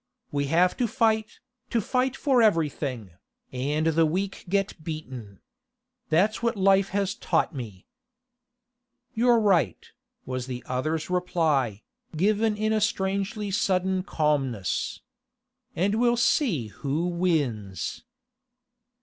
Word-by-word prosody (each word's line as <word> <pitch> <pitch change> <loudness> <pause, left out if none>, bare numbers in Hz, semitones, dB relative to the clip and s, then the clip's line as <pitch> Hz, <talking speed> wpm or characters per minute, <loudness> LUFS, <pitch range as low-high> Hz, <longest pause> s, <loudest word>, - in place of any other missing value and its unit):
We 140 -1 0
have 170 +5 +3
to 245 -3 +1
fight, 220 -2 +1 0.3
to 235 - +1
fight 255 +4 0
for 265 -5 +2
everything, 145 - 0 0.4
and 145 +5 -1
the 165 0 +3
weak 190 +5 -3
get 195 -4 -1
beaten. 130 - -7 0.7
That's 195 +7 +2
what 235 0 0
life 195 0 +4
has 195 0 0
taught - - 0
me.' 110 -9 -8 1.3
'You're 240 0 +4
right,' 175 - +1 0.3
was 130 -1 -4
the 125 -1 -5
other's 155 +7 -2
reply, 155 - 0 0.3
given 210 +4 +2
with 215 0 +1
a 215 - +1
strangely 200 -1 -1
sudden 190 -1 +1
calmness. 140 - -1 0.7
'And 195 +4 +1
we'll 240 +2 +2
see 220 - +1
who 145 - -2
wins. 145 - -1
180 Hz, 115 wpm, -26 LUFS, 140-210 Hz, 1.3 s, life